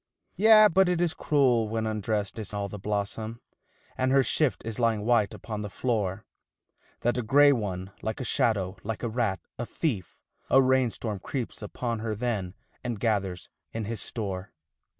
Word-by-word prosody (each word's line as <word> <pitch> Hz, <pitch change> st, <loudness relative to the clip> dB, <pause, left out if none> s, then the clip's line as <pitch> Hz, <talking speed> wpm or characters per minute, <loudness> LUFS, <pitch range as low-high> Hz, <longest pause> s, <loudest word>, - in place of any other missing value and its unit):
Yea, 215 Hz, +1 st, +8 dB
but 190 Hz, -1 st, +4 dB
it 180 Hz, -2 st, +1 dB
is 170 Hz, -2 st, +2 dB
cruel 125 Hz, -7 st, +2 dB
when 110 Hz, 0 st, -1 dB
undressed 110 Hz, -1 st, -2 dB
is 105 Hz, -1 st, -6 dB
all 100 Hz, -1 st, -2 dB
the 105 Hz, +1 st, -8 dB
blossom, 105 Hz, +3 st, -3 dB, 0.6 s
And 130 Hz, 0 st, +1 dB
her 135 Hz, 0 st, +5 dB
shift 135 Hz, 0 st, +1 dB
is 115 Hz, +1 st, -4 dB
lying 115 Hz, -3 st, +1 dB
white 115 Hz, -4 st, +3 dB
upon 105 Hz, -2 st, -6 dB
the 105 Hz, -, -4 dB
floor, 100 Hz, -3 st, -1 dB, 0.8 s
That 120 Hz, +1 st, +1 dB
a -, -, +1 dB
grey 145 Hz, +5 st, +6 dB
one, 95 Hz, -6 st, -2 dB
like 110 Hz, 0 st, -3 dB
a -, -, -3 dB
shadow, 100 Hz, -4 st, +1 dB
like 110 Hz, +2 st, -4 dB
a 120 Hz, -, 0 dB
rat, 110 Hz, -6 st, -1 dB, 0.2 s
a 120 Hz, -, -2 dB
thief, 120 Hz, -, -3 dB, 0.3 s
a 135 Hz, -, +6 dB
rain 130 Hz, -1 st, +4 dB
storm 110 Hz, -3 st, -4 dB
Creeps 125 Hz, +3 st, -5 dB
upon 115 Hz, +2 st, -3 dB
her 110 Hz, -1 st, -2 dB
then 105 Hz, -5 st, -2 dB, 0.3 s
and 120 Hz, -4 st, -3 dB
gathers 100 Hz, -5 st, -1 dB, 0.3 s
in 110 Hz, -1 st, -3 dB
his 110 Hz, 0 st, -3 dB
store. 100 Hz, -4 st, -4 dB
110 Hz, 175 wpm, -27 LUFS, 105-125 Hz, 0.8 s, Yea